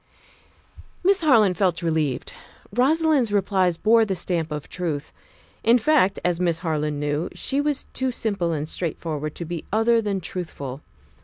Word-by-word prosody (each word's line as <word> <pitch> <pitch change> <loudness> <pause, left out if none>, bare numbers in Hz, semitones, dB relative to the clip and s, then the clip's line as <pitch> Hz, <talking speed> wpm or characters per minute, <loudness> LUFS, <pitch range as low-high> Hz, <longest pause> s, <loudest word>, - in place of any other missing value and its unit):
Miss 390 +1 +4
Harland 220 - +4
felt 180 -3 +1
relieved. 155 -5 -1 0.4
Rosalind's 285 -2 +2
replies 190 -3 +1
bore 225 +4 +4
the 200 -3 -1
stamp 170 -2 -2
of 150 -1 -5
truth. 160 -6 -4 0.5
In 235 +2 +6
fact, 230 -6 +3
as 175 -1 +1
Miss 170 -2 +1
Harland 150 -2 -1
knew, 145 +3 -1
she 275 +1 0
was 290 -1 -1
too 260 0 -1
simple 200 -8 -1
and 155 -1 -2
straightforward 155 -3 -3
to 170 - -5
be 170 -1 -5
other 225 +2 +3
than 205 -3 -1
truthful. 160 -6 -6
180 Hz, 150 wpm, -23 LUFS, 160-230 Hz, 0.5 s, In